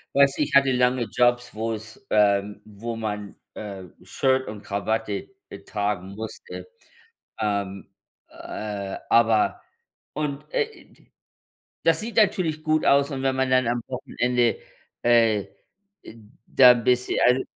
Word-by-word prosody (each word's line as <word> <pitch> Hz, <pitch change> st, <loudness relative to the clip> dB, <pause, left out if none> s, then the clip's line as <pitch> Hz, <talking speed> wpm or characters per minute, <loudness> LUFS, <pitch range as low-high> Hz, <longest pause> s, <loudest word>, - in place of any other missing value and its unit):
Weißt 140 Hz, 0 st, +4 dB
du, -, -, +2 dB
ich 145 Hz, -1 st, -5 dB
hatte 140 Hz, -1 st, +5 dB
lange 125 Hz, 0 st, +2 dB
Jobs, 120 Hz, +2 st, +1 dB
wo 115 Hz, +1 st, -2 dB
es 110 Hz, +1 st, -10 dB
ähm, 105 Hz, -1 st, +2 dB
wo 110 Hz, +3 st, -6 dB
man, 105 Hz, -2 st, -5 dB, 0.2 s
äh, 100 Hz, -3 st, -7 dB, 0.2 s
Shirt 130 Hz, 0 st, 0 dB
und 105 Hz, -1 st, -7 dB
Krawatte 100 Hz, 0 st, -2 dB, 0.2 s
e 100 Hz, -, -9 dB
tragen 100 Hz, -3 st, -2 dB
musste. 110 Hz, -, -8 dB, 0.7 s
Ähm, 100 Hz, -2 st, -2 dB, 0.4 s
äh, 100 Hz, -2 st, -6 dB
aber 115 Hz, -2 st, +3 dB, 0.5 s
und, 150 Hz, -2 st, -3 dB
äh, -, -, +2 dB, 0.2 s
i -, -, -22 dB
die -, -, -26 dB, 0.7 s
das -, -, +3 dB
sieht 230 Hz, +2 st, -6 dB
natürlich 185 Hz, -7 st, +2 dB
gut 155 Hz, 0 st, +1 dB
aus, 140 Hz, 0 st, +4 dB
und 135 Hz, -1 st, -4 dB
wenn 135 Hz, -1 st, +1 dB
man 130 Hz, 0 st, 0 dB
dann 130 Hz, -1 st, +3 dB
am 120 Hz, 0 st, 0 dB
Wochenende, 125 Hz, -1 st, 0 dB, 0.4 s
äh 115 Hz, -4 st, +3 dB, 0.6 s
äh, -, -, -12 dB, 0.3 s
da 125 Hz, -2 st, +7 dB
'n 120 Hz, -1 st, -4 dB
bisschen 125 Hz, +1 st, +1 dB
also, 125 Hz, +2 st, +4 dB
120 Hz, 145 wpm, -24 LUFS, 105-130 Hz, 0.7 s, da